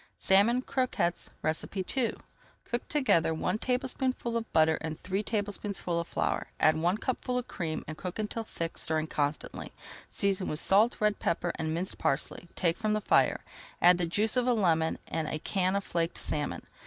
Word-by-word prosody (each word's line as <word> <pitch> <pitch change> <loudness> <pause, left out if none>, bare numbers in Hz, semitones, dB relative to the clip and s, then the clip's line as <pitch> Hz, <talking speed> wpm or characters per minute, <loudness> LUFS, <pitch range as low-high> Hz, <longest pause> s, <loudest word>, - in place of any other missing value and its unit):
SALMON 225 +6 +4
CROQUETTES 255 -11 0 0.5
II 230 +6 0 0.5
Cook 240 - -3
together 210 - +2
one 215 - -1
tablespoonful 255 -1 -1
of 230 -1 -2
butter 160 0 +4
and 160 -1 -4
three 190 +2 -1
tablespoonfuls 205 -4 -2
of 170 - -3
flour. - - -1
Add 155 0 +5
one 175 +5 +1
cupful 250 +2 -2
of 250 - -3
cream, 160 -3 -4
and 155 - -5
cook 180 +3 -6
until 220 +1 -2
thick, 165 -6 -4
stirring 155 -1 0
constantly. 150 -1 -2 0.4
Season 195 -2 0
with 150 - -2
salt, 210 +7 +4
red 210 -1 +2
pepper, 170 +1 0
and 160 0 -3
minced 180 +3 -3
parsley, 135 +5 0
take 170 +1 +1
from 215 -1 +1
the 215 - +2
fire, - - +3 0.4
add 175 0 +6
the 175 - +1
juice 210 +7 0
of 250 0 +2
a 250 - +4
lemon 165 -7 +2
and 160 -1 -2
a 155 - -2
can 185 +3 0
of 200 - 0
flaked 170 -2 -1
salmon. 150 -1 -2
190 Hz, 175 wpm, -30 LUFS, 165-225 Hz, 0.5 s, add